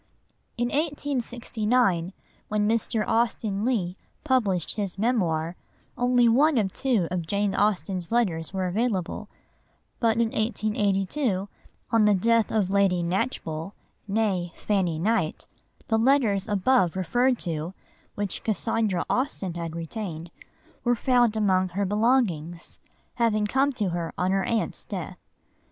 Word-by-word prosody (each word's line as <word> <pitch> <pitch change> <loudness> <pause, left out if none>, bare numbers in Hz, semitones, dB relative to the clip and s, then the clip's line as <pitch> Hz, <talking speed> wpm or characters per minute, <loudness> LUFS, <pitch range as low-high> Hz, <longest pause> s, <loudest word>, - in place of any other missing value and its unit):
In 240 0 0
1869, 245 - 0 0.3
when 210 0 +1
Mr. 225 -1 0
Austen 225 -3 0
Leigh 195 -7 0 0.3
published 215 - +1
his 200 -3 -3
Memoir, 175 -8 0 0.4
only 245 -1 +3
one 275 +5 +4
or 210 -4 +2
two 225 -5 0
of 175 -3 -2
Jane 200 +2 0
Austen's 195 -3 0
letters 180 -9 0
were 190 -1 -2
available; 195 -1 -1 0.7
but 225 -1 +2
in 230 -1 +2
1882, 210 0 0 0.4
on 225 -2 +4
the 210 -1 +5
death 230 +3 +2
of 200 -4 +1
Lady 195 -3 +3
Knatchbull 175 -3 -2 0.4
(née 195 -5 0
Fanny 185 -6 0
Knight), 190 -2 0 0.4
the 225 -1 +2
letters 225 -6 +3
above 205 -2 +2
referred 245 +8 +2
to, 165 0 -3 0.4
which 205 -2 -3
Cassandra 215 -3 0
Austen 225 -8 -1
had 165 -1 -5
retained, 170 -1 -5 0.5
were 245 0 +3
found 240 -2 +2
among 190 -3 +2
her 195 +3 -1
belongings, 200 - 0 0.4
having 220 -3 +2
come 270 +6 +2
to 210 -6 -1
her 170 -1 -3
on 180 +1 +1
her 195 0 +1
aunt's 230 -2 -1
death. - - -6
210 Hz, 125 wpm, -26 LUFS, 180-235 Hz, 0.7 s, the